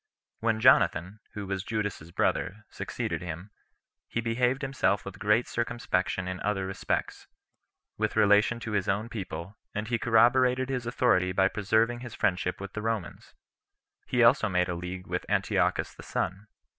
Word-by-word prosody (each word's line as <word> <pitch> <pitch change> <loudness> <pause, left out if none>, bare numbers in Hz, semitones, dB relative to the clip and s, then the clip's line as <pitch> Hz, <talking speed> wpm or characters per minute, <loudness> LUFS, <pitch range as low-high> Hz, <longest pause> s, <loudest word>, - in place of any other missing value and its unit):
When 110 -1 +1
Jonathan, 95 -1 +4 0.2
who 105 -1 -4
was 95 -1 -3
Judas's 100 -7 -3
brother, 105 +5 -1
succeeded - - -4
him, 90 +3 -7 0.6
he - - -2
behaved 125 +4 0
himself 100 -9 0
with 100 - -8
great 105 +3 +2
circumspection 115 -6 -1
in 90 0 -4
other 100 -2 -1
respects, 95 0 -3 0.7
with - - 0
relation 105 +3 +4
to 115 - -5
his 100 -3 0
own 105 +4 0
people; 95 -3 -6 0.2
and 105 +1 -3
he 115 -1 0
corroborated 125 +3 +4
his 125 -3 -2
authority 105 -7 +2
by 95 +1 +3
preserving 110 +4 +1
his 120 -3 -8
friendship 90 -1 0
with 100 0 -7
the 105 - -4
Romans. 110 -4 -4 0.7
He 125 -1 +3
also 115 -2 +5
made 90 -1 +1
a - - -1
league 90 +1 -6
with - - -3
Antiochus - - +1
the - - -12
son. 100 +3 -3
105 Hz, 155 wpm, -28 LUFS, 95-115 Hz, 0.7 s, also